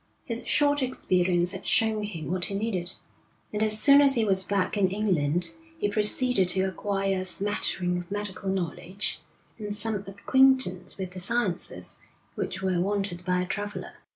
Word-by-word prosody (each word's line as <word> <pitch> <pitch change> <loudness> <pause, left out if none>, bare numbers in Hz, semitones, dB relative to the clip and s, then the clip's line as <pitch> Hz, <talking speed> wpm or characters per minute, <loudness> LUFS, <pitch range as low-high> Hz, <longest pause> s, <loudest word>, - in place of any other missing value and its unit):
His 235 0 -4
short 290 -1 +2
experience 180 -8 +1
had 190 - -8
shown 220 -1 +2
him 165 -7 -6
what 180 -1 0
he 200 - -4
needed, 190 -4 -3 0.6
and 210 - -2
as 215 0 +3
soon 280 +2 +7
as 275 -1 +5
he 230 -2 +2
was 190 -2 +3
back 195 0 -1
in 195 -3 +2
England 175 -5 0 0.2
he 205 - -1
proceeded 210 0 +3
to 190 +1 +1
acquire 195 0 -1
a - - -4
smattering 185 -2 -1
of 175 - -9
medical 200 -1 -4
knowledge, 185 +1 -2 0.4
and 205 -1 -4
some 220 +1 -3
acquaintance 200 -2 +2
with 190 -2 -5
the 185 - -7
sciences 210 -2 +1 0.3
which 190 - -4
were 185 -2 +1
wanted 195 -2 -2
by 180 0 0
a - - -4
traveller. 205 +2 -5
195 Hz, 165 wpm, -27 LUFS, 180-215 Hz, 0.6 s, soon